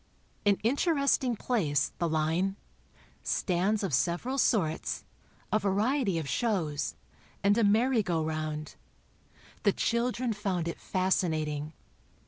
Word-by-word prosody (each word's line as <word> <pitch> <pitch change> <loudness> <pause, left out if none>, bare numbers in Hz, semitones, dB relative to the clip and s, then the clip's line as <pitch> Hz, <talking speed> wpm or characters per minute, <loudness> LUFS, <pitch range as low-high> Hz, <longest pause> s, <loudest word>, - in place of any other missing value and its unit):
An 200 - +6
interesting 280 -1 +2
place, 160 - 0
the 170 -2 +1
"line": 160 +5 +1 0.7
Stands 195 +3 0
of 185 -7 -2
several 175 - 0
sorts; 165 -10 +1 0.5
a 215 - +3
variety 205 +1 +1
of 160 -3 -3
shows, 170 - -1 0.5
and 200 +1 +5
a 230 - +3
merry 225 +4 +4
go 165 -5 -1
round. 155 -1 -3 0.9
The - - +3
children 235 0 0
found 190 -5 -2
it 170 - -4
fascinating. 155 -5 0
195 Hz, 110 wpm, -29 LUFS, 160-230 Hz, 0.9 s, An